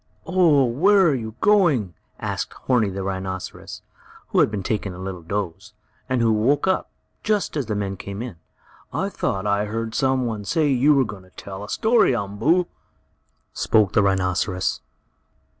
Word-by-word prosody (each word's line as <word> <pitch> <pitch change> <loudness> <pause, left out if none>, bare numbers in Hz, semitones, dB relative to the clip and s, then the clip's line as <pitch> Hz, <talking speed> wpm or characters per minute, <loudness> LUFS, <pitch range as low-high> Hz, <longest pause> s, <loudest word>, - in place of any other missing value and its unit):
"Oh, 165 -6 +4
where 190 - +4
are 155 - +3
you 110 -4 -4
going?" 165 - +3 0.3
asked - - -3
Horni, 120 -6 +2
the 95 0 -4
rhinoceros, 95 -1 -5 0.5
who - - +2
had - - +5
been 105 -2 -4
taking 100 -2 -2
a - - -10
little 95 -1 -6
doze, 100 +3 -4 0.4
and 130 -2 +1
who 115 -1 +3
woke 130 +7 +2
up, 190 - 0 0.3
just 210 -5 0
as 140 -6 -2
the 105 - -2
men 100 -1 -3
came 100 +4 -6
in. 120 -9 -7 0.5
"I - - -1
thought 95 +1 -2
I 100 0 +1
heard 110 +1 -4
some 130 -1 +1
one 110 -3 -3
say 150 - +1
you 140 +3 +4
were 135 -2 +3
going 105 -3 -8
to 95 - -19
tell 95 +1 -9
a 105 - -9
story, 220 - +3
Umboo," 110 - +1 0.9
spoke 105 -4 +2
the - - +4
rhinoceros. 95 -1 0
110 Hz, 170 wpm, -23 LUFS, 95-140 Hz, 0.9 s, had